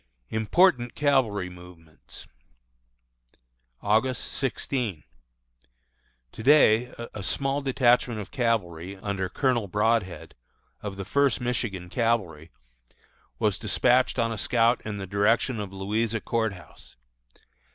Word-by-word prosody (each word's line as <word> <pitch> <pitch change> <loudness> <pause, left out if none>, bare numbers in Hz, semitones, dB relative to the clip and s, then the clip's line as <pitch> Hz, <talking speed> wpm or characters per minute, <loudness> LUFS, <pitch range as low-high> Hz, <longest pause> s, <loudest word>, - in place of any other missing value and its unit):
IMPORTANT 120 - +2
CAVALRY 130 -10 +1
MOVEMENTS. 90 -3 -13 1.6
August 110 +5 +1
16. 125 - -2 1.3
To - - -9
day 125 -3 +5 0.2
a 105 - -6
small 135 +7 -1
detachment 125 -4 +2
of 105 - -8
cavalry 100 -7 -1
under 95 -1 -3
Colonel 120 -1 0
Broadhead, 95 -5 0 0.5
of 100 -2 -5
the 95 - -5
First 140 +4 +2
Michigan 115 -7 -3
Cavalry, 95 -8 -1 0.9
was 105 -3 0
despatched 125 +4 +2
on 115 -1 +1
a 110 - -4
scout 120 0 +2
in 105 -1 -5
the 95 - -5
direction 110 +5 +1
of 100 -2 -5
Louisa 105 +4 -1
Court 110 -2 -1
House. 90 -5 -14
110 Hz, 110 wpm, -26 LUFS, 95-125 Hz, 1.6 s, day